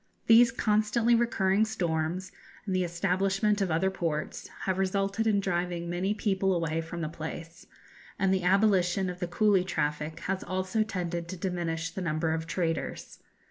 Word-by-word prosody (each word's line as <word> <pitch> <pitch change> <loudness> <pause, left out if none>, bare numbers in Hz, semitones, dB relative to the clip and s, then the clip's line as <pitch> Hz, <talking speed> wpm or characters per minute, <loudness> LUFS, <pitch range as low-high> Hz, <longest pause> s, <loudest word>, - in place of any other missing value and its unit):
These 230 +1 +7
constantly 220 +1 +2
recurring 215 -4 +2
storms, 175 -4 -2 0.3
and 190 -3 -1
the 185 - +2
establishment 195 +4 +1
of 195 - +1
other 170 +4 +1
ports, 165 -5 -3
have 190 -1 -1
resulted 195 +3 0
in 205 -2 +3
driving 175 -2 -2
many 190 +4 0
people 195 -2 +1
away 165 -1 -1
from 170 +1 -6
the 160 - -1
place, 165 +2 -8 0.5
and 195 -1 +2
the 190 - +1
abolition 190 -1 +3
of 180 - -10
the 175 - -2
coolie 195 +1 +3
traffic 150 -3 -2
has 190 0 -2
also 185 +4 -1
tended 175 -5 -2
to 185 +2 -6
diminish 170 -3 -2
the 190 - -5
number 160 -1 0
of 160 0 -3
traders. 165 -3 -3
185 Hz, 160 wpm, -29 LUFS, 170-195 Hz, 0.5 s, These